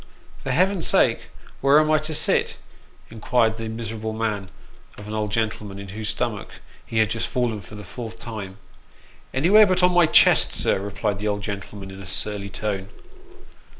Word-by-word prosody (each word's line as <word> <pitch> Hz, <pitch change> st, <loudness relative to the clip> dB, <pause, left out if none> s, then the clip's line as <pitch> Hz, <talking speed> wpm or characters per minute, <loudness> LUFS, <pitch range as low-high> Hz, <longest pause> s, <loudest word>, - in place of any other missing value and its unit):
" -, -, -25 dB
For -, -, -5 dB
Heaven's 180 Hz, +6 st, +2 dB
sake, -, -, +3 dB, 0.3 s
where 140 Hz, +2 st, +6 dB
am 155 Hz, 0 st, +2 dB
I 155 Hz, -, +4 dB
to 155 Hz, +1 st, -4 dB
sit? -, -, +1 dB, 0.3 s
" -, -, -28 dB
inquired 115 Hz, 0 st, +1 dB
the 115 Hz, -1 st, -5 dB
miserable 110 Hz, -1 st, -5 dB
man 105 Hz, -3 st, -3 dB, 0.5 s
of 105 Hz, -, -10 dB
an 105 Hz, -, -6 dB
old 105 Hz, -1 st, -2 dB
gentleman, 105 Hz, -2 st, -2 dB
into 100 Hz, -1 st, -9 dB
whose 105 Hz, 0 st, -4 dB
stomach 110 Hz, -, -3 dB, 0.3 s
he 115 Hz, -, -5 dB
had 110 Hz, -1 st, +3 dB
just 115 Hz, -, -2 dB
fallen 120 Hz, -4 st, -1 dB
for 105 Hz, -, -13 dB
the 105 Hz, -, -9 dB
fourth 115 Hz, +3 st, -8 dB
time. 100 Hz, -5 st, -7 dB, 0.4 s
" -, -, -28 dB
Anywhere 195 Hz, +10 st, +5 dB
but 185 Hz, -1 st, +1 dB
on 180 Hz, -, +5 dB
my 175 Hz, -2 st, +5 dB
chest, -, -, +6 dB
sir," -, -, +1 dB
replied 100 Hz, 0 st, -3 dB
the 105 Hz, -, -3 dB
old 100 Hz, -1 st, -2 dB
gentleman 100 Hz, -1 st, -6 dB
in 95 Hz, 0 st, -10 dB
a 95 Hz, -, -8 dB
surly 100 Hz, +2 st, -2 dB
tone. 100 Hz, -1 st, -4 dB
110 Hz, 190 wpm, -23 LUFS, 100-125 Hz, 0.5 s, where